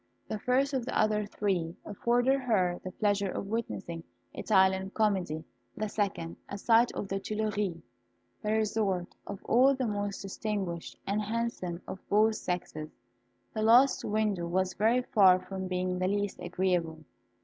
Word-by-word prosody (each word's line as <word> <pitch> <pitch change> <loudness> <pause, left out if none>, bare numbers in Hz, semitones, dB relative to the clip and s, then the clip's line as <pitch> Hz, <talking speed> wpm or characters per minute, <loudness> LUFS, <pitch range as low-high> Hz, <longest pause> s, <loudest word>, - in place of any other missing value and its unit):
The 215 - -3
first 265 +5 +1
of 260 -2 0
the 250 - -2
other 215 -1 +2
three 185 -6 -1
afforded 245 +6 +2
her 190 -9 +1
the 185 - -4
pleasure 200 0 +1
of 195 - -4
witnessing 200 -6 -4 0.3
Italian 190 -2 +3
comedy; 190 -7 0 0.3
the 215 - -1
second, 195 -6 -2
a 200 - -4
sight 230 +3 +4
of 200 - -4
the 195 0 -2
Tuileries, 210 -4 -2 0.6
the 210 - -1
resort 210 -5 0
of 200 -1 -7
all 265 +3 +5
the 260 -1 -1
most 205 -2 -3
distinguished 195 -4 -4
and 205 +2 0
handsome 210 -5 -3
of 190 - -6
both 215 +2 +4
sexes. 155 -3 -4 0.6
The 215 - -2
last 240 +5 +5
window 210 -5 0
was 185 +1 0
very 230 +6 +2
far 190 -6 +5
from 190 0 -5
being 180 0 -1
the 185 - +1
least 205 0 -1
agreeable. 175 -3 -1
200 Hz, 150 wpm, -30 LUFS, 185-220 Hz, 0.6 s, all